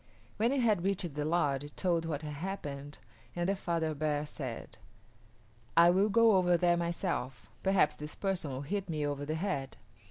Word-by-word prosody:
When 225 +3 +2
it 275 -1 +1
had 215 -7 +2
reached 190 -4 -1
the 150 0 -2
lodge 145 -4 +1
it 145 - -11
told 170 -3 +1
what 155 -2 -3
had 150 -1 -5
happened 145 -4 -5 0.4
and 175 0 0
the 195 - +2
father 165 -4 -1
bear 150 0 -1
said, 130 -6 -7 1.0
"I 170 +1 +8
will 195 +4 +3
go 225 -1 +5
over 180 -1 +4
there 175 0 +3
myself; 170 -6 -3
perhaps 190 -6 +3
this 150 0 -7
person 190 -6 -2
will 130 0 -4
hit 195 +5 -3
me 155 -2 -1
over 145 0 -2
the 155 - -1
head." 160 -7 -3
170 Hz, 185 wpm, -32 LUFS, 145-190 Hz, 1.0 s, I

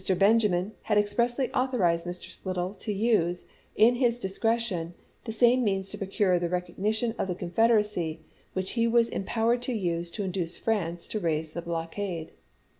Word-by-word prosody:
Benjamin 200 -2 +3
had 210 -2 +1
ex 205 0 +2
pressly 240 +2 +1
authorized 185 -11 +1
Mr. 175 0 -6
Slidell 185 0 -3
to 210 +2 -5
use, 195 -5 +1 0.3
in 225 +3 +6
his 240 -2 +2
discre 225 +3 0
tion, 175 -7 -4 0.3
the 225 - -3
same 240 +3 +4
means 195 -2 0
to 205 - -6
procure 195 -2 +1
the 170 -1 -1
recognition 210 +6 -1
of - - 0
the 180 - -2
Confederacy 185 -3 +1 0.3
which 185 0 -1
he 230 -1 +2
was 235 0 +3
empowered 230 +4 0
to 250 +1 -2
use 175 -5 -1
to 200 +4 -4
induce 180 -3 -3
France 175 -6 -1
to 215 - -2
raise 160 -3 -1
the 170 - -5
blockade. 170 +1 -4
195 Hz, 170 wpm, -28 LUFS, 175-225 Hz, 0.3 s, in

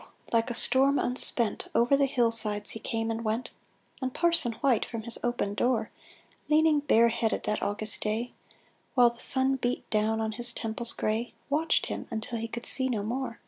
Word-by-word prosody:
Like 230 +2 +1
a 240 - -3
storm 270 +4 +3
unspent, 245 -2 +3
Over 235 +4 +3
the 275 0 +1
hill 240 -3 0
sides 210 -2 +5
he 225 - -6
came 225 +1 -4
and 225 +1 -5
went; 225 +3 -3 0.5
And 260 0 -3
Parson 325 -6 +1
White, 250 -1 0
from 230 -2 -7
his 235 0 +1
open 240 -4 -3
door 245 +3 -1 0.6
Leaning 310 0 +3
bareheaded 235 -5 0
that 210 0 -3
August 210 +1 -1
day, 220 +3 -3 0.6
While 245 -2 +4
the 235 - -11
sun 265 0 +4
beat 245 -1 -4
down 215 +1 0
on 220 0 -3
his 240 +2 0
temples 230 +1 -2
gray, 220 +3 -3 0.2
Watched 315 +3 0
him - - -7
until 225 +1 -5
he 230 - -5
could 235 +1 -8
see 260 -1 +5
no 215 -5 -3
more. 240 +2 -5
235 Hz, 185 wpm, -27 LUFS, 220-260 Hz, 0.6 s, sides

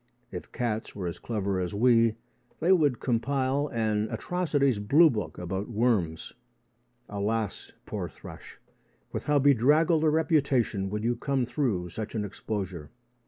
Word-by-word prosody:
If - - -8
cats 115 -3 -3
were 95 -3 -4
as 85 - -4
clever 100 -4 -2
as 90 +2 -3
we, 115 0 +4 0.4
they 170 +4 +2
would 150 -9 +3
compile 135 +3 0
an 110 -3 0
atrocities 145 - 0
blue 145 +10 +5
book 105 -5 -4
about 95 +4 -4
worms. 105 -9 0 0.7
Alas, 105 +2 -3
poor - - -4
thrush, - - -12 0.5
with - - -4
how 150 0 +3
bedraggled 145 +5 +4
a 155 - +4
reputation 140 - +1
you - - -3
would 115 +4 -1
come 135 -2 0
through 120 - -1
such 110 +4 -6
an 105 -2 -1
exposure! 95 -6 -5
115 Hz, 140 wpm, -28 LUFS, 105-140 Hz, 0.7 s, blue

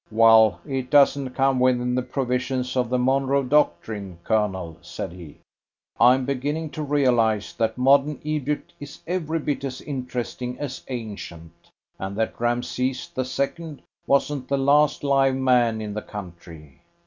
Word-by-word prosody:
"Well, 110 -1 +5
it 130 -3 -3
doesn't 140 -2 +3
come 135 -1 +2
within 125 -1 +2
the 125 - +1
provisions 125 0 -2
of 125 -2 0
the 125 - +1
Monroe 135 +2 +2
Doctrine, 105 - 0
Colonel," 95 -7 -1
said 85 +2 -6
he. 85 -4 -12 0.6
"I'm 125 +2 +5
beginning 145 +4 -2
to 155 - -5
realise 120 -8 +1
that 110 0 -1
modern 140 +2 +3
Egypt 150 -1 -3
is 145 -1 -10
every 165 -2 -2
bit 145 -3 -2
as 130 -2 -4
interesting 125 -2 -5
as 135 -2 -6
ancient, 100 -9 -7 0.5
and 95 +1 -5
that 110 +1 -2
Rameses 125 +2 -1
the 130 - -2
Second 145 +4 -4 0.2
wasn't 140 -1 +1
the 140 - 0
last 145 +2 +3
live 135 -1 +3
man 125 -4 +2
in 105 -1 -5
the 105 - -4
country." 85 -8 -11
125 Hz, 145 wpm, -24 LUFS, 110-140 Hz, 0.6 s, Well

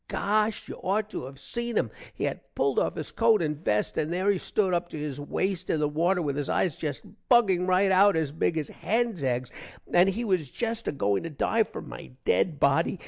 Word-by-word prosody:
gosh 215 +1 0
you - - -6
aught 210 +3 0
to 170 - -5
have 135 +1 -10
seen 235 +9 -4
him. - - +1 0.2
he - - -4
had - - -1 0.2
pulled - - +2
off - - 0
his - - -5
coat 225 -2 +4
and 150 -1 -2
vest 105 0 0
and 155 +1 -1
there 185 +3 +1
he 200 - 0
stood 190 -1 0
up 175 0 0
to - - -7
his 145 -2 -4
waste 185 +5 -2
in 160 - +1
the 150 - +2
water 170 +5 +1
with 140 -2 -1
his 145 -1 -3
eyes 175 -7 +1
jest 145 -3 -4 0.3
bugging 195 -7 +4
rite 185 +1 +3
out 195 0 +5
as 160 -3 0
big 160 +2 0
as 150 -3 -1
hens 225 -3 -1
eggs, 125 -1 -1 0.4
and 180 +2 +6
he 225 +5 -2
was 180 - 0
jest 230 - -3
a - - +1
going 100 -8 0
to 165 - -5
dive 220 +9 +1
for - - -7
my - - -9 0.2
dead 155 -6 +2
body. 165 +6 +2
180 Hz, 230 wpm, -27 LUFS, 150-205 Hz, 0.4 s, and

